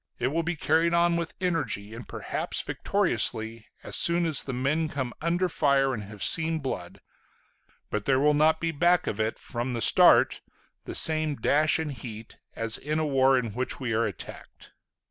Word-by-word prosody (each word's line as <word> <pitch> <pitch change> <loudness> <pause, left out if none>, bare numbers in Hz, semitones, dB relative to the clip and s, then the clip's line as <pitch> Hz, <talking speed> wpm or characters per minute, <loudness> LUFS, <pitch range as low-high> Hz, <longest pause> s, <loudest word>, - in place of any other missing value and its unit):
It 125 - -1
will 165 +4 -1
be 170 +1 -3
carried 165 +2 +1
on 170 0 +2
with 170 -1 -4
energy 160 - -2
and 115 0 -10
perhaps - - -4
victoriously, 110 0 -1 0.2
as - - -2
soon 170 0 +3
as 155 -5 +2
the 135 - -5
men 140 +6 -1
come 130 -4 -4
under 175 +3 0
fire 140 -5 +1
and 110 - -4
have 105 0 -6
seen 160 0 +2
blood; 95 - -6 0.9
but 105 -1 -3
there 130 -1 +2
will 150 +2 +3
not 155 +2 +3
be 165 0 -2
back 175 +4 +2
of 105 - -4
it, 110 0 -1
from 120 +1 -5
the 120 - -3
start, - - +5 0.4
the - - -5
same 155 -2 +4
dash 150 +5 +2
and 160 -2 -4
heat 115 -4 -10 0.2
as 115 +1 -2
in 150 +1 -3
a 155 - 0
war 135 -2 +3
in 115 -5 -3
which 130 +3 -4
we 125 -4 -3
are 115 +1 +1
attacked.... 95 -6 -11
140 Hz, 185 wpm, -26 LUFS, 115-160 Hz, 0.9 s, start